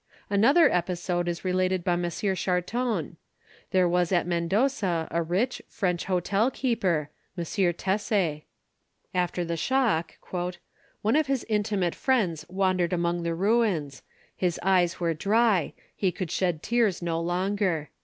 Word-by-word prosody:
Another 270 +11 +5
episode 175 -1 -1
is 170 +1 -3
related 185 0 +1
by 175 - +1
M. 175 0 -1
Charton: 185 - -1 0.5
There 185 -1 +3
was 175 0 +1
at 175 -2 +2
Mendoza 175 0 0
a 170 - +1
rich, 190 +10 -1
French 180 -4 -1
hotel 195 +5 +1
keeper, 185 - 0 0.3
M. 170 - -1
Tesser. 185 -1 0 0.7
After 180 -1 0
the 170 0 -2
shock, 225 - 0 0.9
"one 220 +5 +2
of 310 -1 +2
his 270 -2 -1
intimate 205 -5 0
friends 205 - 0
wandered 185 -2 +1
among 170 0 0
the 170 0 -2
ruins. 190 - +1 0.3
His 180 -2 -1
eyes 180 -2 +2
were 170 -2 +1
dry: 205 +1 +2 0.2
he 190 -3 +1
could 180 -3 -5
shed 175 -5 0
tears 225 -6 +1
no 165 -1 -1
longer. 180 -3 -1
180 Hz, 135 wpm, -27 LUFS, 170-205 Hz, 0.9 s, Another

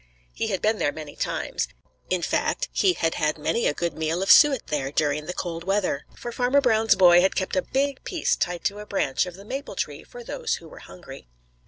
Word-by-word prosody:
He - - -2
had 195 -4 -2
been 215 0 +2
there 145 - +1
many 150 -1 -9
times. - - -2 0.4
In 185 -2 0
fact, - - -1
he 380 -2 +3
had 165 - 0
had 155 -1 0
many 155 +10 0
a - - +1
good 170 -1 -2
meal 160 +3 -1
of 195 - +4
suet 290 -5 +6
there 140 -3 -2
during 150 0 0
the - - -2
cold 170 -2 -4
weather, 190 -6 -1
for 240 - -7
Farmer 250 +3 +2
Brown's 225 -4 +3
boy 175 -1 +7
had 190 - +2
kept 185 -1 -2
a 185 - +3
big 275 +3 -1
piece 345 -4 0
tied 175 -1 -2
to 205 +1 -1
a 210 - -9
branch 180 -4 0
of 180 - -8
the 195 +2 -13
maple 270 +6 -6
tree - - -4
for - - -11
those 475 -1 -2
who - - -11
were - - -13
hungry. 135 - -12
190 Hz, 225 wpm, -25 LUFS, 160-245 Hz, 0.4 s, boy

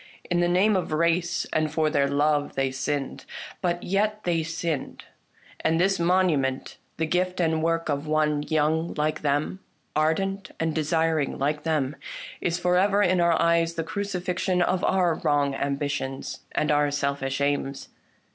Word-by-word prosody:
In 175 - +2
the 175 - +3
name 190 +4 +3
of 185 - -1
race 170 +2 +1
and 155 -1 +1
for 155 0 +1
their 140 -2 +2
love 145 +1 +1
they 135 -1 0
sinned. 135 +1 -3 0.4
But 175 -2 -1
yet 210 +3 0
they 170 -2 +1
sinned; 160 -2 -3 0.6
and 160 +1 +1
this 195 +1 +2
monument, 170 -7 +1 0.2
the 160 - 0
gift 180 +3 0
and 160 -2 +1
work 165 0 0
of 145 0 -2
one 150 -1 +1
young 155 +2 0
like 155 0 -1
them, 145 +5 0 0.4
ardent 190 +6 0
and 160 -1 0
desiring 160 -1 0
like 150 +2 -1
them, 150 -3 0 0.5
is 170 0 0
for 180 0 +2
ever 200 +2 +3
in 185 -1 +3
our 170 -1 +3
eyes 170 0 +2
the 165 - -1
cruci 200 +3 -3
fixion 180 0 +1
of 185 0 0
our 180 -3 +3
wrong 145 -4 +1
ambitions 140 -1 -3
and 150 - +1
our 145 0 +3
selfish 140 -1 -1
aims. 140 -1 -1
160 Hz, 160 wpm, -25 LUFS, 145-175 Hz, 0.6 s, the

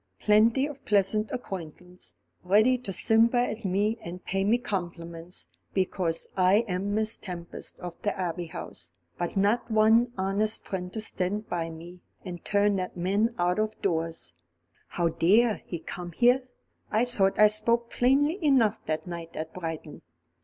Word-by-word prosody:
"Plenty 225 +5 +4
of 290 -2 -8
pleasant 210 +1 +2
acquaintance, 180 -4 -6 0.3
ready 215 +7 +4
to 250 -5 -5
simper 225 +5 +4
at 235 -2 0
me 205 +4 0
and 180 +2 -8
pay 195 +1 0
me 215 +4 +3
compliments, 175 -6 -5 0.3
because 180 -3 0
I 190 +5 +4
am 195 +2 -1
Miss 220 0 0
Tempest 175 -3 -7
of 175 -1 -8
the 205 - -1
Abbey 175 -2 -3
House, - - -8 0.3
but 175 +2 -2
not 205 +5 +2
one 225 +2 +4
honest 200 +3 0
friend 180 -2 -4
to 220 - -3
stand 205 +1 -2
by 165 -1 -2
me, 170 +2 -10 0.3
and 175 -2 -7
turn 205 0 +2
that 185 -1 -4
man 200 +6 +1
out 180 +2 +1
of 215 0 -1
doors. 165 - -1 0.5
How 170 -1 0
dare 210 +8 +3
he 175 - -3
come 175 +2 -7
here? 250 +5 +3 0.4
I 220 +3 +2
thought 195 -6 +2
I 210 - +8
spoke 230 +3 +1
plainly 290 +8 +2
enough 240 -7 +3
that 155 0 -2
night 170 -2 -7
at 160 +1 -5
Brighton." 160 -4 -6
195 Hz, 155 wpm, -28 LUFS, 175-220 Hz, 0.5 s, I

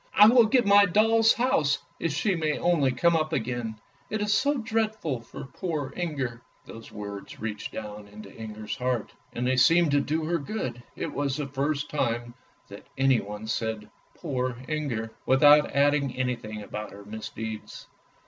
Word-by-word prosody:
" - - -34
I 210 - +9
will 235 -1 +6
give 245 +1 +3
my 200 0 +7
doll's 225 +4 +4
house 160 - +2 0.2
if 165 - -1
she 175 +8 +1
may 155 -3 0
only 160 -7 +2
come 170 +7 +2
up 155 0 0
again', 115 -4 -3 0.3
it 215 - -2
is 205 0 +1
so 280 +7 +2
dreadful 220 - -1
for 115 - -9
poor 145 -2 -4
Inger." 135 -9 -3 0.2
These 115 0 -11
words 100 -1 -8
reached 105 -1 -5
down 105 -1 -7
into 105 -1 -12
Inger's 110 -1 -6
heart, 125 -3 -2 0.2
and 120 - -3
they 130 +1 +1
seemed 165 +4 +5
to 145 - +4
do 155 +2 -1
her 170 +1 0
good. 140 - -4
It 160 - -4
was 140 -1 -1
the 150 - -2
first 140 +1 -2
time 120 -4 -1 0.3
that 100 0 -12
anyone 110 -6 +1
said 110 -1 -3
" - - -36
Poor 125 -2 -3
Inger," 130 -8 -2 0.2
without 145 +3 +6
adding 140 -1 +2
anything 120 -4 -3
about 105 +1 -6
her 100 +1 -12
misdeeds. 110 +1 -7
135 Hz, 170 wpm, -27 LUFS, 115-165 Hz, 0.3 s, I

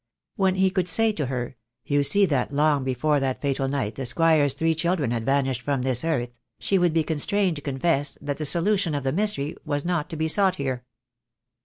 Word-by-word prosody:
When 190 -1 +1
he 190 0 +2
could 185 -2 -1
say 225 +6 +2
to 150 -9 -3
her, 125 -1 -4 0.3
"You 145 0 +1
see 195 +9 +4
that 140 -6 -1
long 145 -1 +2
before 135 +3 0
that 135 -1 -2
fatal 135 -1 -1
night 135 -6 -2
the 135 -2 -3
Squire's 145 +1 +3
three 160 +3 +1
children 160 -5 -1
had 115 -2 -3
vanished 135 -2 0
from 140 -2 -2
this 130 -2 +2
earth," 125 -7 -2 0.2
she 195 - 0
would 175 -1 +2
be 160 0 +1
constrained 170 +3 +1
to - - -7
confess 140 +1 -1
that 145 0 -5
the 155 - -2
solution 175 0 +1
of 140 - -3
the 135 - 0
mystery 170 -5 -2
was 145 +1 -3
not 175 -4 -1
to - - -5
be 160 0 -1
sought 190 +2 +3
here. 130 -4 -4
145 Hz, 210 wpm, -24 LUFS, 135-170 Hz, 0.3 s, see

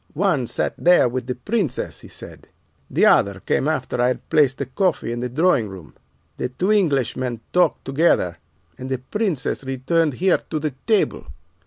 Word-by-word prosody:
"'One 155 -8 +1
sat - - 0
there 175 -6 +5
with 125 0 -4
the 125 - -2
Princess,' 200 - -2
he - - -12
said; - - -10 0.4
'the - - +3
other 100 -1 +4
came 135 - 0
after 135 -5 -1
I 125 - +4
had 125 - -3
placed 140 -4 +3
the 140 - -3
coffee 145 -1 -1
in 120 - -3
the 125 +1 -3
drawing 135 - +2
room. 95 -5 -11 0.4
The 125 - -2
two 180 +11 -1
Englishmen 130 - +1
talked 180 0 +2
together 135 - +1 0.4
and 130 +1 -6
the 130 - -1
Princess 170 - -2
returned 135 +3 0
here 185 +3 +2
to 160 - -2
the 155 0 -2 0.2
table. 220 -3 +1
135 Hz, 175 wpm, -22 LUFS, 125-175 Hz, 0.4 s, there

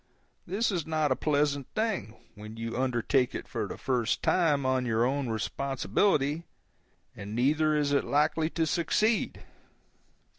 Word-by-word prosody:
This 210 +5 0
is 175 -5 -2
not 155 -3 +1
a - - +4
pleasant 145 -2 0
thing, 215 - -1 0.2
when 110 +1 -10
you 115 0 -4
undertake 125 0 +1
it - - -5
for - - -3
the - - -7
first 125 -4 -1
time 150 -6 +2
on 130 -1 +1
your 115 -1 +1
own 135 0 -1
responsibility, 140 - 0 0.7
and 100 +2 -7
neither 155 +5 +2
is 145 -1 +1
it 140 - +2
likely 155 +2 +1
to 165 -1 0
succeed. 210 +8 0
140 Hz, 145 wpm, -29 LUFS, 125-160 Hz, 0.7 s, a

